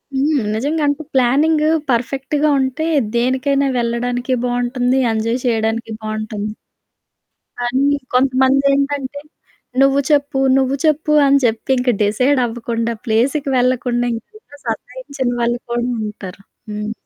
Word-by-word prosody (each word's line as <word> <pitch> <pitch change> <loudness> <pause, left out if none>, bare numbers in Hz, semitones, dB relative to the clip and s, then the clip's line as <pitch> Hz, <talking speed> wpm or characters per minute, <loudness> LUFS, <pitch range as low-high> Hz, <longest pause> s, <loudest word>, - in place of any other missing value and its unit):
హ్మ్. 285 +2 +2 0.2
నిజంగా 290 +8 -1
అంటే 285 +2 -1
ప్లానింగు 300 +5 +3 0.2
పర్ఫెక్ట్‌గా 275 +5 0
ఉంటే, 265 +4 -1 0.3
దేనికైనా 260 +3 +1
వెళ్లడానికి 245 +2 -1
బావుంటుంది. 245 +1 0
ఎంజాయ్ 225 +2 -1
చేయడానికి 225 -1 0
బావుంటుంది. 215 -1 -4 1.1
కానీ 255 +3 +1 0.3
కొంతమందేంటంటే, 275 +2 +2 0.6
"నువ్వు 275 0 +4
చెప్పు, 285 -2 +2 0.2
నువ్వు 265 0 +1
చెప్పు," 305 0 +2
అని 280 0 +5
చెప్పి 225 +2 -1
ఇంకా 250 -1 +2
డిసైడ్ 255 +7 +2
అవ్వకుండా 230 0 -3
ప్లేస్‌కి 265 +6 +1
వెళ్లకుండా 245 -1 +1
ఇంకా 290 - -13
సతాయించిన 280 - -4
వాళ్ళు 240 +1 0
కూడా 240 0 -1 0.2
ఉంటారు. 195 -2 -10 0.3
హ్మ్. 210 +1 -4
255 Hz, 110 wpm, -18 LUFS, 235-280 Hz, 1.1 s, అని